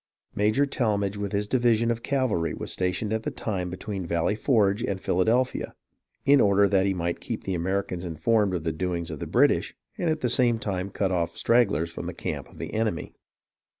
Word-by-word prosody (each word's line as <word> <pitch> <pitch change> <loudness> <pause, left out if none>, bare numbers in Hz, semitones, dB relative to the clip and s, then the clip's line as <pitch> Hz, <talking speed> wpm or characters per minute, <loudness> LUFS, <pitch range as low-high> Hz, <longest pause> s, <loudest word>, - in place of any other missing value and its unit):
Major 110 +7 +2
Tallmadge 105 -7 0
with 100 -1 -3
his 105 0 0
division 120 -1 +2
of 115 0 -3
cavalry 115 - 0
was - - -6
stationed 95 +4 -1
at 110 - 0
the - - -3
time 95 -5 -3
be 90 - -6
tween 95 -3 -5
Valley 85 +4 +1
Forge 105 -3 +2
and 95 -4 -2
Philadelphia, 115 +9 +1 0.5
in 140 -1 +6
order 100 0 +4
that 95 0 +2
he 95 - +1
might 85 -1 -2
keep - - -5
the 95 - -2
Americans 90 0 -2
informed 95 +4 +1
of 85 - -3
the 80 - 0
doings 85 0 -3
of 80 - -6
the - - -5
British, - - +2 0.2
and 175 - +1
at 155 0 -1
the 125 - +1
same 120 -1 +3
time 100 -3 -3
cut 95 -1 -1
off 85 -2 -1
stragglers 100 -9 +2
from - - -6
the - - -5
camp - - -5
of - - -17
the - - -6
enemy. 110 -5 -1
100 Hz, 205 wpm, -26 LUFS, 90-115 Hz, 0.5 s, in